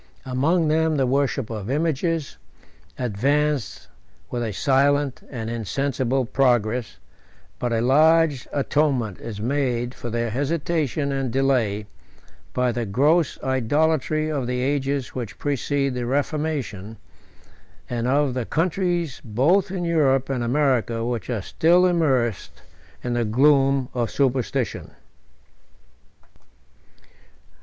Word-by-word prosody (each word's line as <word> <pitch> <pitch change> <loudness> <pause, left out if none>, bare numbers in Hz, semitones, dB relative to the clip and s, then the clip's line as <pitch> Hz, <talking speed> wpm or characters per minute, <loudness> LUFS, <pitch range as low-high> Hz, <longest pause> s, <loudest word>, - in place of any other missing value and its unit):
84 130 - -9
Among 160 +6 +2
them 160 +1 +2
the 135 - +2
worship 135 -2 0
of 105 -1 -5
images 160 +1 -1 0.6
advanced 135 +2 -1 0.4
with 120 - -2
a 115 -2 -2
silent 140 +4 +1
and 115 -4 -5
insensible 130 +3 -1
progress; 120 -3 +1 0.6
but 120 - -1
a 115 -1 +1
large 150 +2 +3
atonement 135 -7 0
is 110 -3 -7
made 125 0 -1
for 120 - -7
their 115 0 -2
hesitation 145 +1 -1
and 135 -2 -1
delay, 120 -6 +1 0.7
by 125 -1 +1
the 120 -1 -3
gross 145 - +2
idolatry 155 +4 +1
of 135 -5 -2
the 125 0 -1
ages 140 0 -1
which 120 -5 -6
precede 140 -1 -1
the 125 -1 -3
reformation, 140 - -2 0.9
and 120 0 -2
of 140 0 +2
the 125 -3 -3
countries, 175 -3 -1
both 150 - +2
in 180 -2 -3
Europe 135 -5 +2
and 125 -3 -1
America, 120 -3 +1
which 120 -1 -3
are 110 -5 -2
still 175 - +3
immersed 135 - 0 0.4
in 120 - -2
the 120 0 +1
gloom 135 +3 +3
of 120 -2 -1
superstition. 130 -3 -1
135 Hz, 115 wpm, -23 LUFS, 120-150 Hz, 0.9 s, large